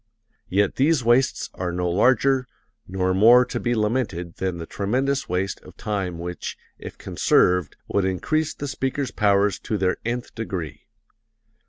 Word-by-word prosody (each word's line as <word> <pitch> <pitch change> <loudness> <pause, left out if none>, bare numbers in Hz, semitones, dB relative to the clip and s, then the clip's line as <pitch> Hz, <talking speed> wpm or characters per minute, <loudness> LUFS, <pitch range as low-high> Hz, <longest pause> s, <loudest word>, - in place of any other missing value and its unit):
Yet 100 +1 +1
these 145 0 +3
wastes 120 +3 +2
are 90 -1 -3
no 90 0 -1
larger, 130 +7 +3 0.4
nor 95 0 0
more 120 +6 +7
to - - -4
be 120 0 0
lamented 105 -6 -1
than 95 -2 -2
the 85 - -6
tremendous 130 +10 -1
waste 90 +2 -2
of - - -15
time 95 -5 -3
which, 85 +1 -6 0.2
if - - -9
conserved 90 -2 +2
would 100 - +1
increase 155 - -1
the 145 - -5
speaker's 135 0 -2
powers 100 -2 +2
to 110 - -3
their 95 -2 +1
nth 120 +1 -3
degree. 85 -10 -6
105 Hz, 150 wpm, -23 LUFS, 90-125 Hz, 0.4 s, more